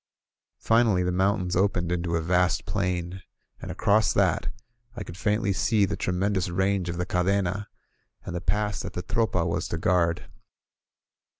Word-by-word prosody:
Finally, 115 -5 +3
the 90 - 0
mountains 95 0 +1
opened 90 -2 +1
into 85 -1 -1
a 80 - 0
vast 90 +2 +1
plain, 90 -2 -2 0.4
and - - -7
across 105 -1 +2
that - - +1 0.4
I - - -5
could 85 - -9
faintly 105 +1 0
see 105 +2 +2
the - - -3
tremendous 95 0 -1
range 95 0 0
of 85 - -4
the 90 - -1
Cadcna, 95 +2 0 0.6
and 90 - -5
the 85 - -3
pass 105 +1 -1
that - - -6
the 90 - -4
Tropa 105 -5 0
was 85 - -2
to 80 - -3
guard. 85 0 +1
90 Hz, 160 wpm, -26 LUFS, 90-100 Hz, 0.6 s, Finally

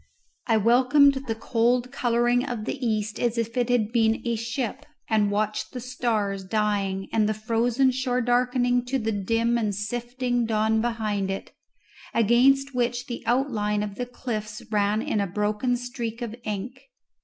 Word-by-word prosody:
I 225 -2 +4
welcomed 255 +6 +5
the 225 - -1
cold 240 +2 +1
colouring 240 -1 +2
of 240 -6 -4
the 260 +2 -4
east 215 -2 -1
as 240 -1 0
if 230 0 -2
it 245 -1 +1
had 230 -3 +2
been 225 -2 +2
a 235 -1 0
ship, 235 +4 -4 0.2
and 215 -2 +2
watched 215 +1 -1
the 250 - -4
stars 225 -6 -1
dying 200 -2 -1
and 215 -1 +3
the 215 - 0
frozen 235 +4 +1
shore 255 -1 -1
darkening 245 0 +2
to 265 +2 -1
the 225 -3 -1
dim 230 +4 +1
and 210 -3 -1
sifting 240 +3 -2
dawn 220 0 +2
behind 215 -4 -1
it, 195 - -5 0.6
against 265 +5 +4
which 245 0 -1
the 240 - -6
outline 220 -5 +1
of 205 -1 -4
the 245 +4 -4
cliffs 225 -2 -5
ran 210 +1 +1
in 210 - 0
a 200 - -1
broken 210 +6 0
streak 240 -1 -5
of 230 -1 -5
ink. 245 +6 -5
230 Hz, 165 wpm, -25 LUFS, 215-245 Hz, 0.6 s, welcomed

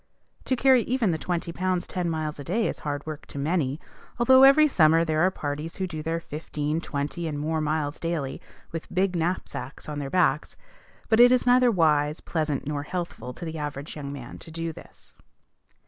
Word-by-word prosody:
To 260 - +1
carry 260 0 +5
even 235 -5 +1
the 160 - -2
twenty 170 -1 -2
pounds 185 +1 -1
ten 180 -2 -2
miles 155 -2 -3
a - - -5
day 215 +9 0
is - - -4
hard 145 -1 -4
work 155 -1 -7
to - - -9
many, 145 -1 0 0.4
although 260 +2 +6
every 275 +3 +8
summer 165 - +4
there 155 -1 +1
are 185 - +5
parties 150 -1 -5
who 190 - -2
do 160 -4 -5
their 165 +2 -2
fifteen, 150 0 -3
twenty, 150 +2 -3
and 150 -2 -3
more 155 +2 -1
miles 155 -1 -1
daily, 165 -5 -3 0.3
with 165 -1 -6
big 185 0 +1
knapsacks 165 -6 -3
on 150 -1 -4
their 140 -1 -4
backs; 150 -4 +1 0.5
but 220 - +3
it 245 +1 +8
is 255 -1 +3
neither 250 0 +5
wise, 155 -6 +2
pleasant, 155 -4 -2
nor 145 0 -2
healthful, 170 -4 -5
to 170 - -8
the 160 -1 -5
average 145 0 -5
young 140 -2 -6
man, 130 -4 -8
to - - -12
do 165 0 -4
this. - - -15
160 Hz, 195 wpm, -26 LUFS, 150-185 Hz, 0.5 s, every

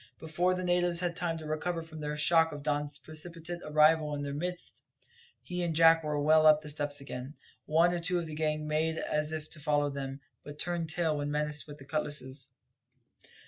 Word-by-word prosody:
Before 175 +3 0
the 185 - -3
natives 175 -1 +2
had 175 -1 -1
time 170 -2 -1
to 160 - -8
recover 165 +2 -2
from 160 -1 -10
the 150 0 -3
shock 165 +2 +4
of 145 -1 -7
Don's 145 0 -1
precipitate 165 +3 -5
arrival 155 0 +3
in 145 - -4
their 140 0 -4
midst, 180 +4 -5 0.6
he 180 0 -4
and 170 -2 -1
Jack 165 0 +6
were 150 -1 -1
well 155 +1 +5
up 155 0 +6
the 150 - -6
steps 145 -1 -1
again. 135 +1 -7 0.3
One 165 +3 +4
or 175 - -1
two 180 +1 -1
of 170 - -2
the 155 - -7
gang 155 0 -1
made 160 +1 0
as 150 0 0
if 155 -1 -4
to 160 - -2
follow 145 -1 +1
them, 135 0 -5 0.2
but 145 0 -9
turned 170 -1 -2
tail 160 -2 +1
when 145 0 -2
menaced 150 0 -1
with 145 -1 -9
the 135 - -13
cutlasses. 145 -3 -4
155 Hz, 205 wpm, -30 LUFS, 150-165 Hz, 0.6 s, Jack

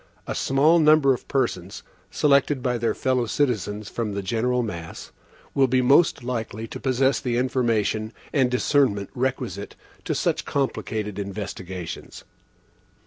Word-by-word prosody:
A - - -3
small 150 +5 +3
number 150 -3 +5
of 125 - -7
persons, 100 -9 -2 0.3
selected 140 -2 +2
by 125 -2 0
their 115 - 0
fellow 130 -2 0
citizens 105 - -1
from 110 -2 -3
the 100 - -3
general 120 +5 0
mass, 85 -7 -7 0.4
will 135 -1 +4
be 130 0 +2
most 140 +1 +4
likely 115 -3 -4
to - - -7
possess 135 +1 +2
the 120 -2 -1
information 115 -4 0 0.2
and 130 -4 +3
discernment 125 -5 +1
requisite 125 -5 -3 0.3
to - - -1
such - - 0
complicated 110 -7 -2
investigations. 95 -3 -6
125 Hz, 135 wpm, -24 LUFS, 105-135 Hz, 0.4 s, number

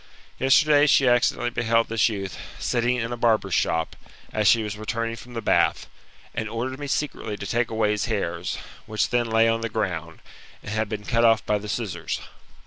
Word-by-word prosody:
Yesterday 145 +2 +5
she 135 -2 +5
accidently 120 0 +2
beheld 115 -1 +1
this, 115 +1 +2
youth, 95 -4 -5 0.2
sitting 120 +1 0
in 115 -1 -3
a 120 - -3
barber's 110 -5 +2
shop, 80 -1 0 0.4
as 105 -1 +1
she 115 +1 +5
was 105 -1 -4
returning 115 +2 -3
from 120 +1 -12
the 115 - -4
bath, - - +2 0.5
and 110 - -3
ordered 130 +4 -4
me 145 - -5
secretly 135 -7 -2
to 100 - -6
take 120 +3 0
away 110 -2 +1
his 105 -1 -1
hairs, 90 -6 -2 0.3
which 110 0 0
then 120 -1 +1
lay 115 0 +4
on 115 0 +1
the 115 - -2
ground, 85 -7 -3 0.4
and - - -6
had 110 -1 -1
been 105 -1 -5
cut 115 +1 +1
off 115 -2 +4
by 105 -1 +1
the 105 +1 -8
scissors. 90 -9 -3
115 Hz, 195 wpm, -24 LUFS, 105-120 Hz, 0.5 s, Yesterday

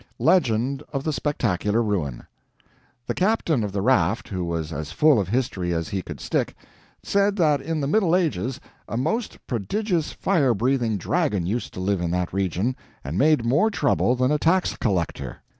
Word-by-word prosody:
LEGEND 135 -5 +2
OF 135 -1 -2
THE 155 - -1
"SPECTACULAR 115 - 0
RUIN" 85 - -2 0.8
The - - -2
captain 180 - +1
of 105 - -3
the 100 0 -2
raft, 110 -4 +2
who 95 -3 -3
was 85 -2 -3
as 75 0 -5
full 150 -6 +4
of 95 - -1
history 95 -7 -1
as 80 -1 -2
he 95 - -2
could - - -8
stick, - - -1 0.5
said 200 0 +2
that 150 -7 +2
in 160 -2 -2
the 140 - -1
Middle 180 +1 +3
Ages 130 - -1 0.3
a 115 - -2
most 170 - -1
prodigious 170 - -1
fire 145 -11 +1
breathing 120 -1 +1
dragon 135 - 0
used 110 +7 -2
to - - -5
live 95 0 0
in 85 - -1
that 90 0 -1
region, 95 +6 0 0.3
and 70 +4 -5
made 145 +2 +3
more 145 - +3
trouble 140 - +1
than 130 +2 +1
a 150 - +2
tax 180 +4 +2
collector. 85 - -2
120 Hz, 175 wpm, -24 LUFS, 95-155 Hz, 0.8 s, full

